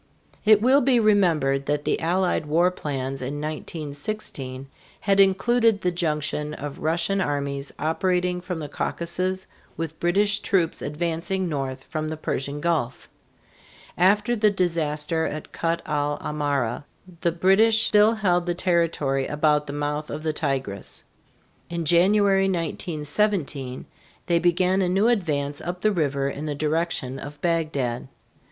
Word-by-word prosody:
It 215 Hz, 0 st, +6 dB
will 265 Hz, +3 st, +5 dB
be 250 Hz, -1 st, +4 dB
remembered 165 Hz, -11 st, +2 dB
that 145 Hz, 0 st, -1 dB
the -, -, +1 dB
Allied 175 Hz, -2 st, 0 dB
war 170 Hz, +4 st, +3 dB
plans 135 Hz, -5 st, -4 dB
in 130 Hz, +3 st, -4 dB
1916 145 Hz, -2 st, -5 dB, 0.3 s
had 200 Hz, -1 st, +2 dB
included 215 Hz, +3 st, +4 dB
the 180 Hz, -, +1 dB
junction 150 Hz, -3 st, -2 dB
of 145 Hz, -1 st, -7 dB
Russian 170 Hz, +5 st, 0 dB
armies 140 Hz, -3 st, -2 dB
operating 180 Hz, +2 st, 0 dB
from 180 Hz, -1 st, -4 dB
the 155 Hz, -2 st, -5 dB
Caucasus 185 Hz, +5 st, -2 dB, 0.3 s
with 160 Hz, -1 st, -5 dB
British 205 Hz, +4 st, +2 dB
troops 175 Hz, -6 st, 0 dB
advancing 170 Hz, +5 st, -2 dB
north 135 Hz, -4 st, -3 dB
from 155 Hz, -1 st, -4 dB
the 155 Hz, -, -4 dB
Persian 140 Hz, -1 st, -3 dB
Gulf. 150 Hz, -8 st, -1 dB, 0.9 s
After 205 Hz, +6 st, +3 dB
the 215 Hz, -1 st, +4 dB
disaster 165 Hz, -4 st, 0 dB
at 155 Hz, 0 st, -6 dB
Kut 165 Hz, 0 st, -1 dB
el 145 Hz, 0 st, -1 dB
Amara 145 Hz, -5 st, -2 dB, 0.4 s
the 170 Hz, -, +2 dB
British 210 Hz, +6 st, +4 dB
still 215 Hz, +2 st, +5 dB
held 180 Hz, -5 st, +1 dB
the 175 Hz, -, 0 dB
territory 165 Hz, -7 st, +1 dB
about 150 Hz, 0 st, +1 dB
the -, -, -4 dB
mouth 145 Hz, +1 st, -3 dB
of 155 Hz, +1 st, -5 dB
the 155 Hz, -1 st, 0 dB
Tigris. 135 Hz, -10 st, -3 dB, 0.7 s
In 170 Hz, -1 st, -3 dB
January, 195 Hz, +4 st, +4 dB
1917, 155 Hz, -4 st, -2 dB, 0.4 s
they 170 Hz, -2 st, +2 dB
began 180 Hz, +2 st, +2 dB
a 180 Hz, -, +1 dB
new 195 Hz, +5 st, +3 dB
advance 145 Hz, -10 st, -1 dB
up 180 Hz, +1 st, -5 dB
the 215 Hz, -, +3 dB
river 140 Hz, -6 st, 0 dB
in 145 Hz, +2 st, -4 dB
the 145 Hz, -, -2 dB
direction 155 Hz, -3 st, -1 dB
of 145 Hz, +1 st, -9 dB
Bagdad. 155 Hz, -8 st, -1 dB
165 Hz, 140 wpm, -24 LUFS, 145-185 Hz, 0.9 s, It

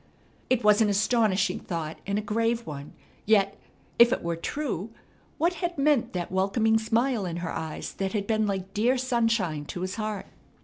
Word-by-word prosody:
It 255 Hz, -2 st, +2 dB
was 210 Hz, +1 st, +5 dB
an 215 Hz, -, +4 dB
astonishing 205 Hz, -2 st, +2 dB
thought 165 Hz, -2 st, -5 dB
and 200 Hz, 0 st, 0 dB
a 210 Hz, -, -1 dB
grave 230 Hz, +2 st, 0 dB
one, 145 Hz, -2 st, -7 dB, 0.3 s
yet, 200 Hz, -2 st, +3 dB, 0.4 s
if 235 Hz, 0 st, +8 dB
it -, -, -1 dB
were 170 Hz, 0 st, -1 dB
true, 225 Hz, -, -3 dB, 0.5 s
what 340 Hz, +3 st, +2 dB
had 350 Hz, -2 st, -2 dB
meant 280 Hz, -3 st, +2 dB
that 175 Hz, -1 st, -3 dB
welcoming 220 Hz, +4 st, +2 dB
smile 230 Hz, +1 st, +1 dB
in 170 Hz, -1 st, -4 dB
her -, -, -3 dB
eyes 160 Hz, -1 st, -5 dB
that 195 Hz, +1 st, -3 dB
had 205 Hz, -2 st, -1 dB
been 215 Hz, 0 st, +1 dB
like 195 Hz, -1 st, -3 dB
dear 240 Hz, +5 st, +2 dB
sunshine 230 Hz, -11 st, 0 dB
to 175 Hz, -, -6 dB
his 185 Hz, +2 st, -3 dB
heart? 215 Hz, -2 st, -3 dB
210 Hz, 180 wpm, -27 LUFS, 185-235 Hz, 0.5 s, if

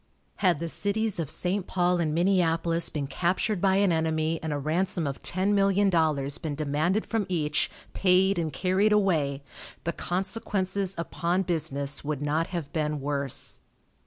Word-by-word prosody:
Had 180 Hz, -5 st, +3 dB
the 165 Hz, +3 st, -4 dB
cities 205 Hz, +3 st, -1 dB
of 160 Hz, -4 st, -2 dB
St. 185 Hz, +4 st, -1 dB
Paul 180 Hz, -1 st, +1 dB
and 160 Hz, -3 st, 0 dB
Minneapolis 170 Hz, -1 st, +2 dB
been 145 Hz, -2 st, -3 dB
captured 180 Hz, +6 st, 0 dB
by 190 Hz, -1 st, +3 dB
an 195 Hz, -1 st, +3 dB
enemy 160 Hz, 0 st, 0 dB
and 160 Hz, -, -3 dB
a 145 Hz, -, -1 dB
ransom 165 Hz, +4 st, 0 dB
of 140 Hz, -1 st, -4 dB
ten 190 Hz, +3 st, 0 dB
million 195 Hz, 0 st, +3 dB
dollars 150 Hz, -5 st, +1 dB
been 155 Hz, -3 st, -3 dB
demanded 155 Hz, +7 st, 0 dB
from 220 Hz, -4 st, -1 dB
each, 150 Hz, -4 st, +1 dB, 0.2 s
paid 190 Hz, 0 st, +3 dB
and 160 Hz, -2 st, -1 dB
carried 195 Hz, +5 st, +2 dB
away, 155 Hz, -9 st, +1 dB, 0.4 s
the 170 Hz, -, -1 dB
consequences 190 Hz, 0 st, -2 dB
upon 170 Hz, +2 st, -1 dB
business 145 Hz, -5 st, -2 dB
would 145 Hz, -1 st, -2 dB
not 155 Hz, +3 st, 0 dB
have 170 Hz, -6 st, -5 dB
been 150 Hz, -2 st, -1 dB
worse. 140 Hz, -1 st, -2 dB
170 Hz, 160 wpm, -27 LUFS, 155-190 Hz, 0.4 s, Had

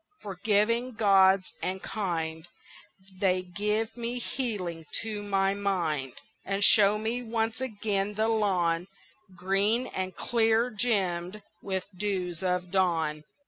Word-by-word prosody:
forgiving 215 Hz, +5 st, 0 dB
gods 195 Hz, -3 st, +4 dB
and 190 Hz, +1 st, -3 dB
kind, 165 Hz, -5 st, -3 dB, 0.7 s
They 185 Hz, -1 st, +2 dB
give 210 Hz, +5 st, -2 dB
me 240 Hz, 0 st, -3 dB
healing 190 Hz, -, -4 dB, 0.2 s
to 215 Hz, -2 st, -4 dB
my 195 Hz, -1 st, +1 dB
mind, 170 Hz, -10 st, -1 dB, 0.3 s
And 195 Hz, +1 st, -1 dB
show 205 Hz, +1 st, +6 dB
me 225 Hz, +3 st, -2 dB
once 225 Hz, 0 st, -2 dB
again 210 Hz, -4 st, -2 dB
the 220 Hz, +1 st, +1 dB
lawn 185 Hz, -6 st, +1 dB, 0.5 s
Green 200 Hz, +6 st, +1 dB
and 185 Hz, -1 st, -4 dB
clear 230 Hz, +1 st, +2 dB
gemmed 200 Hz, -3 st, -1 dB, 0.2 s
with 190 Hz, -2 st, -2 dB
dews 180 Hz, -3 st, -2 dB
of 180 Hz, -1 st, -1 dB
dawn. 165 Hz, -5 st, +1 dB
195 Hz, 115 wpm, -28 LUFS, 180-220 Hz, 0.7 s, show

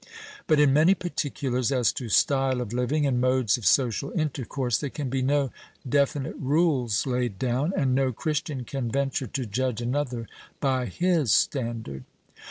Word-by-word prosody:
But 155 Hz, -2 st, +4 dB
in 145 Hz, -2 st, +5 dB
many 160 Hz, +7 st, +5 dB
particulars 135 Hz, -8 st, -2 dB
as 125 Hz, -4 st, +2 dB
to 120 Hz, -4 st, -5 dB
style 135 Hz, +2 st, +2 dB
of 120 Hz, -2 st, -4 dB
living 135 Hz, +5 st, 0 dB
and 125 Hz, -3 st, +1 dB
modes 130 Hz, -4 st, +2 dB
of 115 Hz, -7 st, -2 dB
social 125 Hz, -, +2 dB
intercourse, 135 Hz, -4 st, -1 dB
there 145 Hz, -, -3 dB
can 135 Hz, -2 st, -5 dB
be 135 Hz, -1 st, 0 dB
no 140 Hz, 0 st, +1 dB, 0.4 s
definite 140 Hz, 0 st, 0 dB
rules 140 Hz, -, +1 dB
laid 125 Hz, -5 st, -1 dB
down, 130 Hz, -, 0 dB
and 130 Hz, -2 st, +2 dB
no 135 Hz, 0 st, +2 dB
Christian 145 Hz, +1 st, -3 dB
can 130 Hz, -1 st, -3 dB
venture 135 Hz, +1 st, -1 dB
to 130 Hz, +3 st, -3 dB
judge 120 Hz, +2 st, -2 dB
another 120 Hz, -1 st, -2 dB, 0.3 s
by 130 Hz, -3 st, 0 dB
his 160 Hz, -, +1 dB
standard. 115 Hz, -, 0 dB
130 Hz, 160 wpm, -26 LUFS, 120-145 Hz, 0.4 s, in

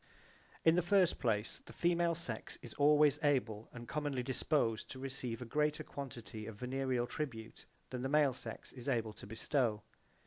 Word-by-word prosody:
In 160 Hz, -, +8 dB
the 180 Hz, -, +4 dB
first 185 Hz, 0 st, +3 dB
place 110 Hz, -4 st, 0 dB
the -, -, -10 dB
female 170 Hz, -1 st, +2 dB
sex 170 Hz, +2 st, -3 dB
is -, -, -7 dB
always 150 Hz, 0 st, +5 dB
able 120 Hz, -7 st, +1 dB
and 120 Hz, -1 st, -9 dB
commonly 145 Hz, -4 st, -1 dB
disposed 125 Hz, -3 st, 0 dB
to -, -, -7 dB
receive 130 Hz, -3 st, -4 dB
a -, -, -7 dB
greater 150 Hz, +5 st, +1 dB
quantity 115 Hz, -7 st, -7 dB
of 110 Hz, -, -6 dB
venereal 125 Hz, +1 st, 0 dB
tribute 120 Hz, -6 st, -5 dB, 0.2 s
than 125 Hz, -1 st, -3 dB
the 130 Hz, -, -1 dB
male 145 Hz, -2 st, +4 dB
sex -, -, -8 dB
is 125 Hz, +1 st, -5 dB
able 115 Hz, -4 st, 0 dB
to 100 Hz, -, -11 dB
bestow. 115 Hz, -1 st, 0 dB
130 Hz, 170 wpm, -36 LUFS, 115-150 Hz, 0.2 s, In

